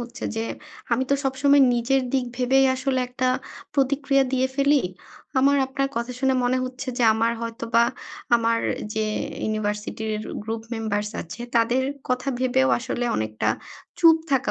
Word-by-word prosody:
হচ্ছে 240 +2 -7
যে, 225 - -1 0.5
আমি 260 - +2
তো - - +5
সবসময় 280 +1 +4
নিজের 245 +3 +2
দিক 265 -2 +2
ভেবেই 260 +2 +3
আসলে 260 0 0
একটা 255 +1 -2 0.5
প্রতিক্রিয়া 275 0 +2
দিয়ে 260 0 +2
ফেলি। 280 0 +3 0.6
আমার 280 +2 +4
আপনার 275 +1 -1
কথা 235 +2 -2
শুনে 265 0 +2
মনে 250 +1 +2
হচ্ছে 260 +1 -6
যে, - - +1
আমার 230 +1 +1
হয়তোবা 230 0 +1 0.5
আমার 230 0 +1 0.4
যে 220 0 0 0.4
ইউনিভার্সিটির 215 +1 -2 0.3
গ্রুপ 225 +1 -4
মেম্বার্স 210 -2 -2
আছে, 170 - -10 0.2
তাদের 235 +3 +3 0.3
কথা 255 +2 -1
ভেবেও 245 - +2
আসলে 245 - -3
অনেকটা 110 0 -1 0.5
চুপ 330 -1 +7
থাকা 270 -1 +2
250 Hz, 145 wpm, -24 LUFS, 230-270 Hz, 0.6 s, চুপ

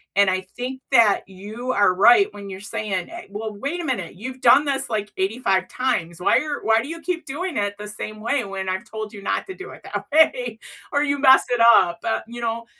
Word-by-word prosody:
and 200 0 +5
I 185 0 0 0.2
think 260 +2 -5
that 230 -6 +5
you 210 +7 -6
are 205 -6 +3
right 365 - +5
when 200 -1 -9
you're 190 0 -7
saying, 200 -2 -3
eh, 345 +1 -9
"Well, 215 +2 -5
wait 280 +12 -4
a 345 - -4
minute, 215 - -3
you've 255 +6 -8
done 265 +5 +6
this, 275 -1 -1
like, 210 -2 -3
85 190 -2 0
times. 190 -11 -2
Why 180 - +3
are 300 -1 -4
why 220 0 +3
do 245 - -7
you 330 +2 -7
keep 350 0 -3
doing 345 +4 -4
it 205 0 -1
the 210 0 -8
same 215 +1 -7
way 245 +3 0
when 195 -2 -5
I've 190 +4 -4
told 220 -1 -6
you 205 - -9
not - - -2
to 380 - -6
do 385 - -9
it - - -13
that - - -5
way? 250 -7 +3 0.3
Or 285 0 +2
you 285 -1 0
messed 265 -2 +6
it 245 - +1 0.2
up?" 175 -3 +2
But, 225 - -1
you 240 +1 -8
know, 230 0 -3
225 Hz, 235 wpm, -22 LUFS, 200-270 Hz, 0.3 s, done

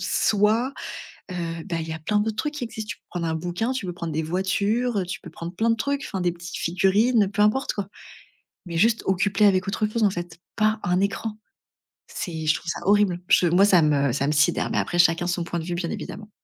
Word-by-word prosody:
soit, 215 +6 +2 0.6
heu, 165 -2 -4
bah, 170 - -1
il 160 - -5
y - - -3
a 160 - -6
plein 210 +6 +1
de 220 +1 0
trucs 295 +8 -3
qui 255 - -3
existent. 220 -1 -7
Tu - - -5
peux - - -50
prendre 170 -2 -3
un 160 - -1
bouquin, 180 +9 -2
tu 255 -8 -3
peux 180 - -3
prendre 170 -2 -5
des 160 +1 -1
voitures, 200 +7 0
heu, 185 - -1
tu 180 - -5
peux - - -11
prendre 170 +2 -7
plein 225 +4 +1
de 230 - +2
trucs, 280 +4 -1
enfin, 190 - -4
des 175 -1 +1
petites 175 0 -8
figurines, 200 +6 +3
heu, - - -3
peu 205 +1 -3
importe, 215 +6 +2
quoi. 200 -2 -4 0.8
Mais 170 -1 -4
juste, 225 +5 +3
occupe 195 +1 0
les 210 - +6
avec 185 -2 +2
autre 210 +2 0
chose, 220 +1 -1
en 205 - +5
fait! 175 -2 -6 0.2
Pas 215 0 +2
un 180 +1 +1
écran! 210 +2 -2 0.7
C'est 160 -4 -5
je 155 - +4
trouve - - -7
ça - - -5
horrible. 205 -4 +3
Je 180 - +5
moi, 180 +4 +5
ça 185 -4 +5
me 140 -3 +2
ça 140 +1 0
me - - +2
sidère 150 0 +2
mais - - -1
après, 175 - -2
chacun 170 0 +4
son 175 -1 -1
point 170 0 -3
de 160 - -6
vue, 175 - -3
bien 170 -1 -3
évidemment. 215 0 -7
190 Hz, 250 wpm, -24 LUFS, 170-215 Hz, 0.8 s, les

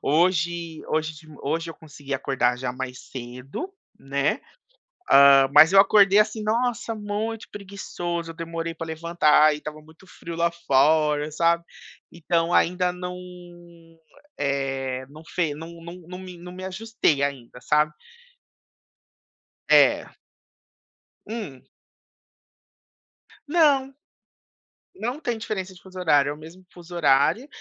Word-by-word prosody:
hoje 170 0 0
hoje 155 0 -1
de 155 +1 -15
ma 150 - -13
hoje 165 +4 -2
eu 165 - -7
consegui 145 -3 -8
acordar 130 -2 0
já 130 0 -3
mais 130 0 -6
cedo, 125 - -7 0.3
né. 140 +1 -1 0.7
Ah, 140 -1 +7
mas 155 +5 +7
eu 195 - +8
acordei, 200 0 +6
assim, 215 0 +1
nossa, 230 +1 -1
muito 215 +1 -4
preguiçoso, 175 -4 -5
eu 165 - -8
demorei 165 0 -5
pra 165 - -6
levantar 160 -2 +3
e - - -6
estava 155 0 -8
muito 160 +4 -19
frio 170 -2 -9
lá 170 0 +1
fora, 150 -1 +2
sabe. 170 +2 +2 0.5
Então 170 0 -1
ainda 180 +1 +2
não, 180 0 -6 1.2
eh, 135 -2 -2
não 155 +2 -13
fe 170 -4 -1
não 165 +2 -10
não 170 +1 -9
não 180 +1 -8
me 185 -1 -10
não 175 +1 -10
me 185 +1 -9
ajustei 190 - 0
ainda, 130 -3 -4
sabe. 150 +3 +2 1.8
É. - - +5 1.2
Hum. 205 - -7 1.8
Não. 285 -4 +3 1.0
Não 245 -1 -4
tem 240 -6 -2
diferença 190 -4 -5
de 180 - -17
fuso 185 -1 -11
horário, 145 -5 +3
é - - -2
o - - -12
mesmo 165 +4 -13
fuso 175 0 -12
horário, 145 - +3
165 Hz, 130 wpm, -24 LUFS, 145-185 Hz, 1.8 s, eu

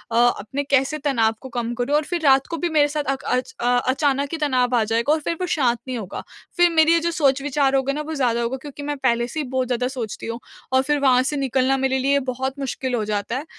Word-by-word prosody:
अपने 240 +3 +1
कैसे 275 +1 +1
तनाव 225 -4 +2
को 260 - -9
कम 235 0 -3
करूँ 280 +4 +1
और 300 - +2
फ़िर 345 +2 -3
रात 270 0 +5
को 335 - -4
भी 345 +1 -1
मेरे 300 -2 +3
साथ 300 - 0
अक 270 - -14
अच 250 0 -1
अ, - - -3 0.2
अचानक 275 +1 +1
ही 330 - -2
तनाव 255 -4 +1
आ 230 - +3
जाएगा 230 +6 +1
और 315 - +1
फ़िर 335 +2 -3
वो 360 - -1
शांत 245 -8 +1
नहीं 255 -2 -3
होगा। 200 -4 -6 0.3
फ़िर 350 0 +5
मेरी 320 0 +4
ये 335 - +4
जो 340 +1 -1
सोच 275 -4 +2
विचार 280 -1 +1
होगे 270 +1 +1
ना, 300 - -3
वो 310 +1 -5
ज़्यादा 240 -4 +1
होगा 235 +3 -2
क्योंकि 285 +1 -9
मैं 290 0 -3
पहले 240 -3 +1
से 310 - -5
ही 300 - -2
बहुत 260 -1 -1
ज़्यादा 250 0 0 0.2
सोचती 210 - -8
हूँ 230 +1 -4 0.3
और 260 - +5
फ़िर 295 +1 0
वहाँ 255 -2 +4
से 295 +2 -2
निकलना 265 0 +1
मेरे 265 0 +1
लिए 280 +2 +2
बहुत 265 +2 -3
मुश्किल 260 -1 -2
हो 220 - -1
जाता 210 +3 -2
है। 290 - -5
265 Hz, 260 wpm, -22 LUFS, 245-290 Hz, 0.3 s, रात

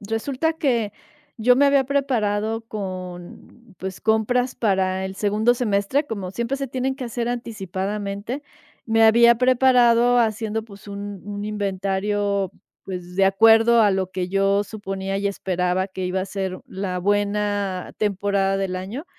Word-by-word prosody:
resulta 255 +9 -1
que, 245 - 0 0.4
yo 245 +2 +4
me 285 +2 +5
había 280 -1 +4
preparado 225 -6 0
con, 185 0 -8
pues, 190 0 -6
compras 225 +3 +1
para 190 -4 0
el 190 0 -6
segundo 210 +3 +2
semestre, 235 +4 0
como 200 -7 -5
siempre 235 +6 -2
se 275 -1 -4
tienen 260 +2 -2
que 270 - -8
hacer 235 0 -3
anticipadamente. 205 0 -4 0.5
Me 225 -1 +3
había 235 +2 +7
preparado 245 -1 +4
haciendo, 220 -1 -1
pues, 200 -3 -14
un 200 -1 -7
un 205 0 -5
inventario, 200 -1 -1 0.3
pues, 180 -1 -7
de 195 - +4
acuerdo 225 +4 +5
a 210 - +4
lo 190 -1 -1
que 180 -1 -2
yo 195 +1 +2
suponía 195 -2 -4
y 200 - -1
esperaba 185 -1 -1
que 190 -1 -5
iba 185 +1 -1
a - - -2
ser 190 -1 -4
la 190 -1 -3
buena 205 -1 -1
temporada 200 -1 0
del 190 -1 -2
año 200 - -6
205 Hz, 145 wpm, -22 LUFS, 195-235 Hz, 0.5 s, había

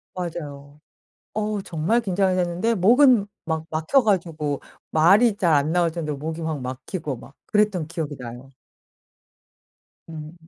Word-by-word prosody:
맞아요. 150 -5 -6 0.6
어우 210 -1 -1
정말 170 +9 0
긴장이 190 -3 +1
됐는데 180 +6 0
목은 235 +2 +5 0.2
막 160 -1 -2
막혀 160 - +2
가지고 165 -8 0 0.3
말이 200 +8 +5
잘 175 -5 +2
안 145 +2 +2
나올 170 -2 +2
정도로 155 -4 -3
목이 160 +2 -5
막 160 -3 -3
막히고 130 +3 -5
막 135 - -14
그랬던 210 -6 +1
기억이 155 -3 -4
나요. 125 +1 -9 1.6
음. 155 0 -8
165 Hz, 265 characters per minute, -23 LUFS, 150-200 Hz, 1.6 s, 목은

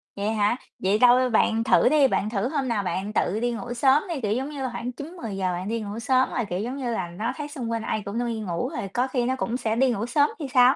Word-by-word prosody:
vậy 205 +2 -1
hả? 210 +2 +2 0.2
Vậy 195 +3 +1
đâu? 250 +1 +6
Bạn 225 0 +2
thử 245 - +4
đi, 295 -3 +5
bạn 210 -4 0
thử 215 +1 -1
hôm 275 -4 -1
nào 220 -4 0
bạn 190 +3 -3
tự 210 0 +1
đi 240 0 0
ngủ 240 +1 -5
sớm 270 +4 +4
đi, 310 -6 -3
kiểu, 210 -3 -1
giống 265 +5 -2
như 290 -2 -6
là, 260 - -1
khoảng 240 +1 -4
9:00-10:00 230 - -4
bạn 180 +3 -4
đi 230 0 -2
ngủ 210 +1 -5
sớm 255 +2 +2
rồi, 240 -4 -1
kiểu, 180 +1 -2
giống 245 +6 -3
như 250 -3 -2
là, 185 -5 -2
nó 215 +7 -3
thấy 295 -1 -5
xung 260 -6 -5
quanh 230 -1 -1
ai 215 - -2
cũng 200 +4 -3
đi 230 -1 -2
ngủ 205 +4 -2
rồi 235 -10 -4
có 250 +2 +1
khi 255 -2 -1
nó 260 +1 0
cũng 245 -2 -2
sẽ 220 -3 -1
đi 260 +2 +3
ngủ 225 -1 -2
sớm 285 +5 +3
thì 295 - -4
sao, 250 +1 +6
235 Hz, 285 wpm, -25 LUFS, 210-260 Hz, 0.2 s, đâu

